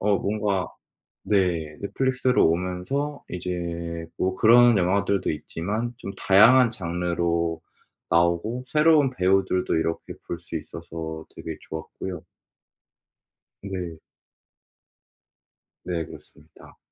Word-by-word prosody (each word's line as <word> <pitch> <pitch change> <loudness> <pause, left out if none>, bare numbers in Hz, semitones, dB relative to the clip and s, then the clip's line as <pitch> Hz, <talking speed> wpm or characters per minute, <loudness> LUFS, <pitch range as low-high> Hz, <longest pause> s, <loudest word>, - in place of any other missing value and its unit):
어 100 0 +3
뭔가 100 -2 -1 0.6
네 85 -7 +1
넷플릭스로 130 +3 +2
오면서 90 - -2
이제 85 -2 -4
뭐 95 0 0
그런 120 -1 +6
영화들도 100 +2 +1
있지만 105 +10 -4
좀 100 - -6
다양한 115 +6 +6
장르로 85 -3 -1 0.5
나오고 85 +9 +1
새로운 150 -3 +4
배우들도 95 -3 +1
이렇게 80 +1 -2 0.2
볼 85 - -3
수 85 - -7
있어서 80 -1 -7
되게 80 -1 -6
좋았고요. 80 +2 -7 1.4
네. 90 -4 -5 1.9
네 85 -3 -2
그렇습니다. - - -16
90 Hz, 220 characters per minute, -25 LUFS, 85-110 Hz, 1.9 s, 그런